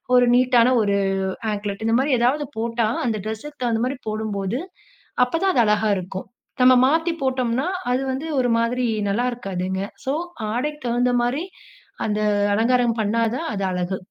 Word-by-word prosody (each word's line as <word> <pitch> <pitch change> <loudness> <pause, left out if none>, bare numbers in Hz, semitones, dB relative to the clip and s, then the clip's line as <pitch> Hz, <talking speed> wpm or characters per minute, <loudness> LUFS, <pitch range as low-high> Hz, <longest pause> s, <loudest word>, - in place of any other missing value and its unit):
ஒரு 250 0 +5
நீட்டான 250 0 +4
ஒரு 200 -1 +1 0.5
ஆங்க்லெட். 205 0 -4
இந்த 225 - +3
மாரி 280 +2 +1
ஏதாவது 270 +5 +1
போட்டா 230 0 0 0.2
அந்த 220 -3 -1
ட்ரெஸுக்கு 255 +7 -7
தகுந்த 230 -2 0
மாரி 260 +2 -3
போடும்போது. 215 +1 -2 0.7
அப்பதான் 345 +9 0
அது 240 - +5
அழகா 210 0 +2
இருக்கும். 190 +1 -6 0.4
நம்ம 255 0 +8
மாத்தி 325 +3 +1
போட்டோம்னா, 260 +1 0 0.2
அது 255 +1 +1
வந்து 270 +5 -4
ஒரு 245 -2 +2
மாதிரி 245 +2 0 0.2
நல்லாருக்காதுங்க. 195 -5 -2 0.2
ஸோ, 265 - 0 0.4
ஆடைக்கு 295 +5 -2
தகுந்த 245 +1 +1
மாரி 270 +8 -1 0.6
அந்த 210 0 -1 0.4
அலங்காரம் 240 +1 +2
பண்ணா 215 +2 0 0.2
தான் 330 - -4
அது 200 -1 -3
அழகு. 180 +1 -2
240 Hz, 150 wpm, -22 LUFS, 215-255 Hz, 0.7 s, நம்ம